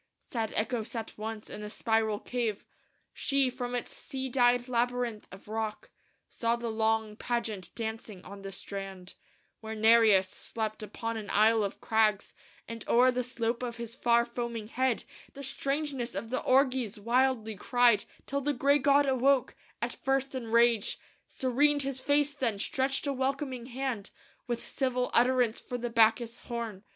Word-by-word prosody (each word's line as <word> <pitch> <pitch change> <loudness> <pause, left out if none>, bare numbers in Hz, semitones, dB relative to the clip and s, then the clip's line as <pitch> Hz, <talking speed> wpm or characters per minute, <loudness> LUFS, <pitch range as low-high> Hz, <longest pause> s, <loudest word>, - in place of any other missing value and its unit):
"Sad 225 -4 -4
Echo 230 +2 +1
sat 225 0 -6
once 215 0 -6
in - - -7
a 210 - -6
spiral 220 -1 +1
cave; 230 -4 -3 0.5
She, 275 -2 +1
from 245 -1 -4
its 245 - -4
sea 265 -1 -5
dyed 245 -1 +3
labyrinth 245 -2 -1
of 190 +2 -12
rock, 220 0 -4 0.4
Saw 230 0 0
the 235 -1 -4
long 220 -1 0
pageant 225 -5 -3
dancing 220 -4 -5
on 200 +1 -9
the 195 0 -7
strand, 195 -1 -7 0.5
Where 220 -1 -6
Nereus 220 -3 +5
slept 215 +3 -5
upon 225 +2 -4
an 215 -2 -6
isle 220 +1 +4
of 200 - -4
crags, 215 -2 +2 0.3
And 230 -1 -6
o'er 250 +2 +6
the 250 0 -1
slope 235 -1 -2
of 245 -2 -4
his 235 -1 -5
far 235 -1 +3
foaming 235 -2 -5
head 255 0 0 0.3
The 280 - -8
strangeness 275 -2 -2
of 230 - -4
the 255 - 0
orgies 255 -5 +2
wildly 235 -1 +1
cried, 240 0 +3 0.2
Till 280 +1 -2
the 290 +2 0
gray 280 +3 +3
god 285 +1 +4
awoke, 265 -1 +2 0.3
at - - -1
first 270 0 -1
in 255 -3 -4
rage; 230 -1 +3 0.3
Serened 285 +3 +2
his 265 -1 -2
face 290 +1 +2
then; 245 -7 -1
stretched 270 +6 -1
a 280 - 0
welcoming 265 -2 -2
hand 255 -5 -3 0.4
With 240 -1 -3
civil 255 -2 -1
utterance 245 -2 +3
for 245 - -5
the 240 0 -4
Bacchus 230 +1 +3
horn. 230 -5 -6
235 Hz, 160 wpm, -30 LUFS, 220-260 Hz, 0.5 s, o'er